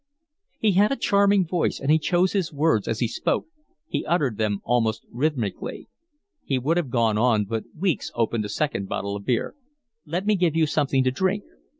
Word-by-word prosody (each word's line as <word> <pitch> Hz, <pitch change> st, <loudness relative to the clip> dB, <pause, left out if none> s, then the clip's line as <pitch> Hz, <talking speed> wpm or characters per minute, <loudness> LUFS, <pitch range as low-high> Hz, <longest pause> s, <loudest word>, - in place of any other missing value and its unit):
He 215 Hz, -, +2 dB
had 200 Hz, +5 st, +4 dB
a -, -, +2 dB
charming 200 Hz, -4 st, +3 dB
voice, 170 Hz, 0 st, -1 dB
and 140 Hz, -, 0 dB
he 160 Hz, -, +5 dB
chose 180 Hz, +4 st, +1 dB
his 190 Hz, -5 st, 0 dB
words 150 Hz, -7 st, +1 dB
as 115 Hz, +1 st, -2 dB
he 120 Hz, -, +2 dB
spoke; -, -, -1 dB, 0.4 s
he -, -, -2 dB
uttered 145 Hz, -, +1 dB
them 105 Hz, -2 st, 0 dB
almost 115 Hz, -2 st, 0 dB
rhythmically. 125 Hz, -5 st, -3 dB, 0.5 s
He 135 Hz, -, 0 dB
would 150 Hz, +7 st, 0 dB
have 165 Hz, -7 st, -1 dB
gone 115 Hz, -3 st, +2 dB
on, 110 Hz, -3 st, +3 dB
but 110 Hz, +2 st, -3 dB
Weeks 180 Hz, -2 st, 0 dB
opened 115 Hz, -1 st, 0 dB
a 105 Hz, -, -5 dB
second 105 Hz, -4 st, -2 dB
bottle 100 Hz, 0 st, -3 dB
of 100 Hz, 0 st, -7 dB
beer. 120 Hz, -3 st, 0 dB, 0.5 s
"Let 175 Hz, +5 st, -2 dB
me 215 Hz, -, +3 dB
give 175 Hz, -4 st, +1 dB
you 165 Hz, -1 st, +4 dB
something 140 Hz, -3 st, +1 dB
to 130 Hz, -, +2 dB
drink." 190 Hz, +9 st, 0 dB
140 Hz, 195 wpm, -24 LUFS, 115-175 Hz, 0.5 s, he